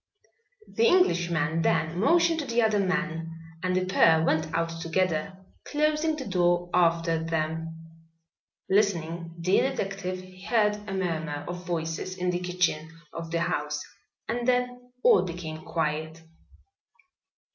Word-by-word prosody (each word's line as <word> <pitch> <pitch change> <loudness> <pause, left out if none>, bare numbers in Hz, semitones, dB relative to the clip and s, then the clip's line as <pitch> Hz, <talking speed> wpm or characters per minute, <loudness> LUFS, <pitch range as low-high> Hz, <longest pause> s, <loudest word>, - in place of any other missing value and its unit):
The 460 - +2
Englishman 170 - +2
then 165 +1 +1
motioned 330 - +3
to 290 - -4
the 235 0 +2
other 215 -2 +2
man, 180 -4 -1 0.3
and 185 0 0
the 185 0 +1
pair 165 -3 +4
went 155 -1 +1
out 165 0 -2
together, 180 +1 -1 0.3
closing 305 +1 +1
the 275 -4 -6
door 175 -2 +1
after 165 -2 +2
them. 165 0 -4 0.7
Listening, 170 -4 0
the 180 +3 +2
detective 195 -7 -2 0.2
heard 210 -3 +3
a - - -3
murmur 160 -5 -2
of 175 0 -6
voices 165 +2 -3
in 180 0 0
the 175 - -1
kitchen 180 -3 -1 0.2
of 165 0 -6
the 170 0 -1
house 150 -2 -1 0.5
and 240 +2 -2
then 250 0 0
all - - +6
became 170 -3 -6
quiet. 160 0 -2
175 Hz, 130 wpm, -27 LUFS, 165-195 Hz, 0.7 s, all